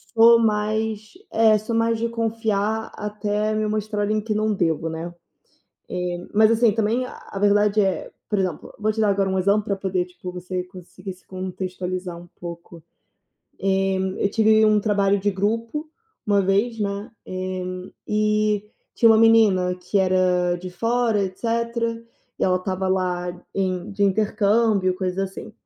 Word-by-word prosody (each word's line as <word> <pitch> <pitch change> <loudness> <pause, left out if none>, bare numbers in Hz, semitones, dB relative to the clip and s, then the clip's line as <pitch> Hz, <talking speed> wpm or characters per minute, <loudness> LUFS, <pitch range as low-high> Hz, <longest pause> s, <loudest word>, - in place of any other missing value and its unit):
sou 230 +1 +7
mais, 215 0 0 0.2
eh, 220 -1 +5
sou 220 +2 -3
mais 230 0 +1
de 235 - -1
confiar, 220 -2 -1
até 210 0 -2
me 215 0 0
mostrarem 215 0 -1
que 215 0 -2
não 215 +1 +1
devo, 165 -4 0
né. 165 +2 -5 1.0
Eh, 175 - -3 0.2
mas, 215 +1 +5
assim, 230 0 +4
também, 225 +3 0
a 200 - -10
verdade 205 +1 +3
é, 190 -2 -1 0.2
por 210 - +1
exemplo, 185 -2 -3
vou 215 +1 +1
te 220 - -6
dar 210 - +3
agora 195 -1 +1
um 190 0 0
exemplo 200 +3 +2
para 200 -1 -1
poder, 190 -2 -1
tipo, 180 0 -9
você 180 0 -4
conseguir 185 +1 -10
se 185 - -23
contextualizar 185 -1 -5
um 175 - -13
pouco. 170 -1 -9 1.1
Eh, 190 - 0 0.3
eu 200 - +2
tive 220 0 +4
um 215 -1 +4
trabalho 200 -1 +2
de 205 +1 +1
grupo 230 +10 -2 0.4
uma 205 -1 +3
vez, 205 +5 +1
né, 200 +3 -3 0.2
eh, 185 +3 -1 0.3
tinha 230 - +5
uma 220 - +6
menina 210 -5 +5
que 180 +3 -1
era 180 -1 +2
de 180 +1 -8
fora 230 +2 +1
etc., 185 +4 -8 0.9
e - - +1
ela 185 -1 +3
estava 185 0 -2
lá 180 -1 0 0.2
em 185 -2 -2
de 205 - -2
intercâmbio, 205 -1 +2
coisa 185 +1 -1
assim, 195 +3 -8
200 Hz, 155 wpm, -23 LUFS, 185-215 Hz, 1.1 s, sou